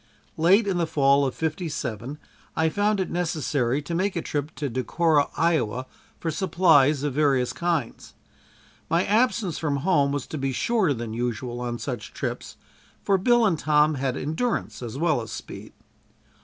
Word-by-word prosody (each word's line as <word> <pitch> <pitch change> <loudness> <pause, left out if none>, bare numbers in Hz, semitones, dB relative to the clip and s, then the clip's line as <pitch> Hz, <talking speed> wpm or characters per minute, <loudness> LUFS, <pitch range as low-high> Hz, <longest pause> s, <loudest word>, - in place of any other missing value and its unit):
Late 190 +7 +4
in 190 -3 0
the 170 - +1
fall 140 -2 +3
of 130 - -5
'57 150 - -4 0.4
I 160 0 +2
found 205 +4 +1
it 190 - -2
necessary 150 -6 -1
to 170 - -5
make 185 +3 0
a 170 - -1
trip 145 0 -3
to 145 +1 -3
Decorah, 145 +5 +1
Iowa, 130 -7 +1 0.3
for 165 - -2
supplies 155 -5 +3
of 145 -2 -1
various 135 -4 +2
kinds. 170 -3 -3 0.7
My 170 +3 +2
absence 220 -4 +1
from 150 -3 -1
home 145 -7 +3
was 145 -2 -2
to 155 - -6
be 135 -1 -1
shorter 195 - +1
than 115 -1 -5
usual 120 +1 -3
on 120 -1 -3
such 120 -5 -6
trips, - - -5 0.5
for 195 -1 +2
Bill 240 +4 +4
and 175 -7 +1
Tom 150 0 +3
had 135 -2 -2
endurance 160 - -2
as 120 +1 -6
well 155 -5 +1
as 110 - -8
speed. - - -8
150 Hz, 165 wpm, -25 LUFS, 130-175 Hz, 0.7 s, Late